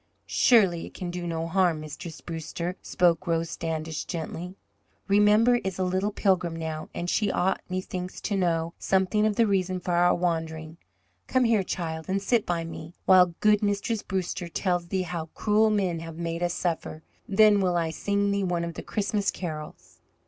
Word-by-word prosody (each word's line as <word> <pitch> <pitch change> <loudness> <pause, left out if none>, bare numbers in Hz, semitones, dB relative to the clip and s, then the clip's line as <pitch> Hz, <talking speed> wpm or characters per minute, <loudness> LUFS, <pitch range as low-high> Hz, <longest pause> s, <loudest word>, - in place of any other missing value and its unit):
"Surely 195 -9 +3
it - - -15
can 180 -2 -4
do 175 0 -4
no 165 -1 -2
harm, 175 -2 +2
Mistress 155 +2 -8
Brewster," 170 +2 -5
spoke 175 +1 +1
Rose 165 0 0
Standish, 160 -1 -3
gently. 170 +2 -5 0.5
"Remember 210 +4 +5
is 190 -5 -4
a 190 - 0
little 185 +3 0
Pilgrim 180 -5 +1
now, 160 -1 -5
and 175 - -4
she 205 +3 +1
ought, 190 +2 0
methinks, 185 0 -4
to 205 - -1
know 170 -3 0
something 195 +3 +2
of 210 - 0
the 230 - +4
reason 185 -3 0
for 180 - -4
our 175 +1 +4
wandering. 160 -2 -2 0.5
Come 255 - +2
here, 230 -3 +3
child, 160 -4 -4
and 195 +1 +1
sit 215 +3 +1
by 170 -1 0
me, 165 +1 -8
while 180 -2 +6
good 210 -1 +4
Mistress 205 +1 0
Brewster 185 -3 -3
tells 175 0 -1
thee 185 +1 -1
how 170 -2 -4
cruel 215 +1 +3
men 190 -6 0
have 165 -1 -8
made 170 0 -3
us 175 0 0
suffer. 165 -2 -3 0.3
Then 205 0 +5
will 180 -2 +1
I 165 -1 0
sing 200 +4 0
thee 200 0 0
one 175 -2 0
of 170 0 -4
the - - -6
Christmas 205 -1 -1
carols." 155 -4 -7
180 Hz, 180 wpm, -27 LUFS, 165-200 Hz, 0.5 s, while